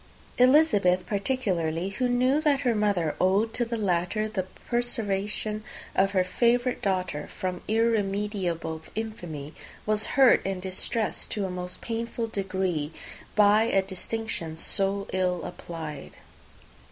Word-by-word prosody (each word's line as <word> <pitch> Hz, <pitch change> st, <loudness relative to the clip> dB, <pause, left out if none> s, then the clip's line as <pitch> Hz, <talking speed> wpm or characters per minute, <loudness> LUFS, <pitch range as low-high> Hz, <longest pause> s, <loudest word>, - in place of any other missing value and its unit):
Elizabeth 245 Hz, -, +5 dB
particularly, 195 Hz, -6 st, -1 dB
who 245 Hz, +6 st, -1 dB
knew 255 Hz, +4 st, +3 dB
that 290 Hz, -3 st, +2 dB
her 245 Hz, -4 st, +2 dB
mother 200 Hz, -7 st, +1 dB
owed 200 Hz, +5 st, +3 dB
to 245 Hz, -, +1 dB
the 235 Hz, 0 st, -3 dB
latter 195 Hz, +1 st, 0 dB
the 215 Hz, -3 st, -2 dB, 0.3 s
preservation 215 Hz, -3 st, -1 dB, 0.3 s
of 195 Hz, +1 st, +3 dB
her 185 Hz, -2 st, +4 dB
favourite 240 Hz, +6 st, +1 dB
daughter 185 Hz, -6 st, -1 dB
from 185 Hz, -1 st, -4 dB
irremediable 205 Hz, -7 st, 0 dB
infamy, 175 Hz, -10 st, -5 dB, 0.3 s
was 215 Hz, 0 st, +1 dB
hurt 265 Hz, -3 st, +7 dB
and 195 Hz, -1 st, -2 dB
distressed 190 Hz, +4 st, -2 dB
to 205 Hz, -3 st, -2 dB
a 190 Hz, -, -3 dB
most 180 Hz, 0 st, -5 dB
painful 230 Hz, 0 st, -3 dB
degree 190 Hz, -7 st, -2 dB, 0.4 s
by 210 Hz, +1 st, +6 dB
a 195 Hz, -4 st, +2 dB
distinction 190 Hz, -3 st, -4 dB
so 195 Hz, +3 st, +1 dB
ill 180 Hz, -1 st, 0 dB
applied. 155 Hz, -4 st, -7 dB
200 Hz, 125 wpm, -27 LUFS, 180-225 Hz, 0.4 s, hurt